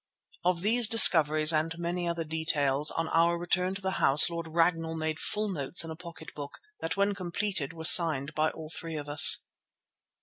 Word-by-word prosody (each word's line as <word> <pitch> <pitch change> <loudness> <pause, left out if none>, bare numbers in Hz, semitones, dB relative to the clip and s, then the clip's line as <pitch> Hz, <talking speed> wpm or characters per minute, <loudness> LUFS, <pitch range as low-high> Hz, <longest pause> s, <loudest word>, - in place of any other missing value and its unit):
Of 175 -1 -2
these 230 +2 +3
discoveries 155 -8 +5
and 160 +2 -4
many 175 +1 -6
other 170 -1 -5
details, 150 -3 -3
on 165 0 -5
our 170 +1 -1
return 180 +2 -3
to 195 - -9
the 190 - -4
house, 145 +5 +5
Lord 170 -1 -8
Ragnall 165 0 -3
made 160 0 -6
full 215 0 -5
notes 170 -3 -2
in 165 - -9
a - - -9
pocket 170 -1 -14
book, 145 -1 -11 0.2
that - - -7
when 200 +1 -1
completed 185 -4 -6
were 160 -1 -10
signed 155 -4 +4
by 155 +1 -2
all 155 0 -13
three 165 -1 -9
of 145 -1 -9
us. 145 0 +6
165 Hz, 190 wpm, -26 LUFS, 155-175 Hz, 0.2 s, us